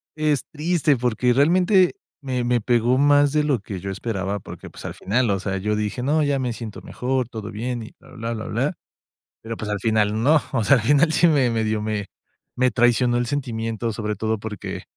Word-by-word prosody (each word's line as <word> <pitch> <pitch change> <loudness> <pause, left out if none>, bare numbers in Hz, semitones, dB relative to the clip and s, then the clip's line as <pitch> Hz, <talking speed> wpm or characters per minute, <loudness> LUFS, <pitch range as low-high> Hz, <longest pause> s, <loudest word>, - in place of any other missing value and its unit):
es 155 -3 0
triste 155 -2 +1
porque 125 0 +1
realmente 180 - +4 0.3
me 130 -3 -2
me 120 0 +2
pegó 120 +2 +2
más 145 0 +4
de 150 -1 +2
lo 145 -5 +1
que 100 -1 -7
yo 95 +2 -5
esperaba 100 -1 -3
porque, - - -10
pues, - - -12
al - - -5
final, 120 +4 0
o 100 -1 +1
sea, 95 0 -3
yo 105 +3 -1
dije: 105 +3 -2
"No, 150 +4 +2
ya 140 -1 +1
me 125 -2 -2
siento 110 -2 -8
mejor, 130 -1 -2
todo 110 -2 -7
bien 120 +2 -4
y 110 - -10
bla, 135 - -19
bla, 115 -1 -4
bla, 110 -2 -5
bla", - - -1 0.7
pero, 115 0 -6
pues, 105 - -5
al 105 - -1
final 110 0 +1
no. 150 +4 +5
O 115 - +1
sea, 140 - +5
al 115 - -1
final 145 +5 +4
sí 170 +1 +4
me 140 -6 +3
me 115 -1 0
dio, 110 0 -1
me 105 -1 -2 0.5
me 130 0 +3
traicionó 120 +2 +3
el 120 - 0
sentimiento, 115 -4 -3
sobre 105 -1 -3
todo 110 +1 -1
porque, 105 -2 -6
120 Hz, 215 wpm, -22 LUFS, 110-140 Hz, 0.7 s, no